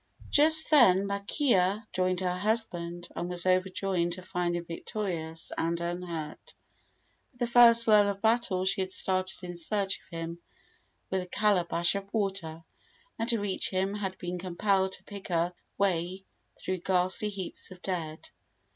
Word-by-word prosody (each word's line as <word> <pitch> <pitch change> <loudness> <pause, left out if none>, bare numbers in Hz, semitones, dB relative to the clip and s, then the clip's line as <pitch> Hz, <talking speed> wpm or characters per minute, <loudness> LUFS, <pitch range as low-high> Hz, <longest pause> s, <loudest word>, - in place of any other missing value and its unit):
Just 315 +2 +5
then 200 -10 +6
Makea 200 - +1
joined 185 0 0
her 180 -1 -1
husband, 175 -5 0
and 175 +1 -3
was 175 0 -1
overjoyed 185 -1 0
to 185 +1 -7
find 180 -2 -2
him 175 0 -4
victorious 165 -2 -4
and 170 +1 -1
unhurt. 170 -3 -6 0.8
With 245 - -25
the - - +3
first 235 -1 +7
lull 210 -2 +6
of 200 -1 -4
battle 220 -4 +1
she 195 +1 +2
had 190 0 -3
started 185 0 -1
in 175 0 -6
search 195 +3 -1
of - - -25
him 165 0 -6 0.7
with 190 -1 0
a 180 - -8
calabash 180 -4 +2
of 200 0 -5
water, 190 -7 -2 0.6
and 225 +1 -2
to 230 -3 +1
reach 200 -2 -1
him 190 +1 -1
had 190 -2 -4
been 180 0 -5
compelled 190 +1 0
to - - -9
pick 200 -2 -9
her 175 0 0 0.2
way 185 0 -1 0.3
through 185 -1 -3
ghastly 185 +3 +1
heaps 195 -3 -5
of 185 - -12
dead. 165 -4 -4
185 Hz, 155 wpm, -29 LUFS, 175-200 Hz, 0.8 s, first